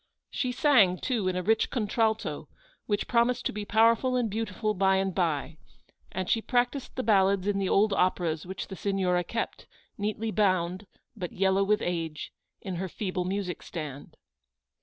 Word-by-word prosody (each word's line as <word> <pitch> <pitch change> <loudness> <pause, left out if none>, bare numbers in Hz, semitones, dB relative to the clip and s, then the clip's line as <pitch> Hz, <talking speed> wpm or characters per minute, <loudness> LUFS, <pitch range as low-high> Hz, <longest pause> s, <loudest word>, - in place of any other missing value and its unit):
She 255 -2 -1
sang, 245 -9 +4
too, 230 -6 -1
in 185 - 0
a 180 - -1
rich 220 +3 +2
contralto, 220 -2 -1 0.4
which 205 -1 -1
promised 240 +1 +2
to - - +1
be 210 0 -5
powerful 230 +4 +3
and 240 -4 0
beautiful 215 0 -2
by 190 0 +3
and 190 0 0
by; 160 -3 -1 0.5
and 185 0 -3
she 225 - +2
practised 245 +3 -1
the 255 - -2
ballads 195 -3 +3
in 205 -1 0
the 195 - 0
old 205 +1 +3
operas 175 -4 +1
which 190 +1 -6
the 190 - -6
Signora 185 -3 0
kept, 230 +6 -4 0.3
neatly 215 +2 -2
bound, 185 -2 +1 0.3
but 180 -5 -5
yellow 190 +1 +2
with 210 +2 +1
age, 165 -3 -3 0.3
in 185 -3 -5
her 190 +1 -3
feeble 185 -1 -3
music 190 -1 -3
stand. 150 -5 -7
195 Hz, 165 wpm, -28 LUFS, 180-220 Hz, 0.5 s, sang